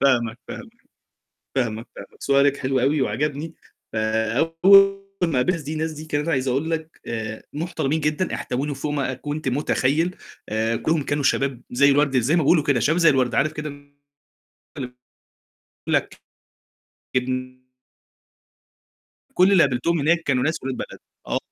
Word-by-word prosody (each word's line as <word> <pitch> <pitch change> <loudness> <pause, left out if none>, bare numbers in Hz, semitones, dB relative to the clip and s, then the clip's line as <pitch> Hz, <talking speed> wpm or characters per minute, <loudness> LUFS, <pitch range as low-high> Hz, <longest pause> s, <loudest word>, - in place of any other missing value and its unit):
فاهمك، 120 -4 +2
فاهماك. 240 -1 -9 0.8
فاهماك، 115 -3 -1
فعلًا - - -9
سؤالك 140 0 +3
حلو 130 -1 0
أوي 140 +3 +2
وعجبني، 150 +4 -2 0.4
فأول 165 - +4 0.2
ما 165 -2 +1
قابلت 125 - +3
الناس 165 - -4
دي، 150 +2 -5
الناس 160 +1 -2
دي 155 0 -8
كانت 150 0 -2
عايز 135 -4 0
أقول 140 +6 0
لك 160 0 -4
آآ، 110 -1 -4
محترمين 160 -1 -1
جدًا، 150 +4 -1
احتووني 140 +3 -3
فوق 145 +2 -3
ما 140 -3 -1
أ - - -5
كنت 145 +2 -5
متخيّل 150 +5 +1 0.3
آآ، 110 +1 0
كلّهم 155 +4 0
كانوا 145 0 -1
شباب 135 -2 +1
زي 140 +3 +4
الورد 140 -1 +3
زي 130 +7 +2
ما 170 - +2
بيقولوا 155 +2 +4
كده 145 -4 +2
شباب 155 +9 +2
زي 165 -2 +6
الورد، 130 -4 +1
عارف 155 +2 +2
كده؟ 150 0 -5
اللي 145 0 -17 1.7
يقول - - 0
لك - - -2 0.9
ابن 130 0 -2 1.8
كل 185 +2 +5
اللي 185 -4 +6
قابلتهم 140 +5 +1
هناك 170 +4 +2
كانوا 130 -5 +1
ناس 155 +2 -1
ولاد 130 0 -3
بلد - - -7 0.3
آه، - - 0
145 Hz, 155 wpm, -23 LUFS, 130-160 Hz, 1.8 s, زي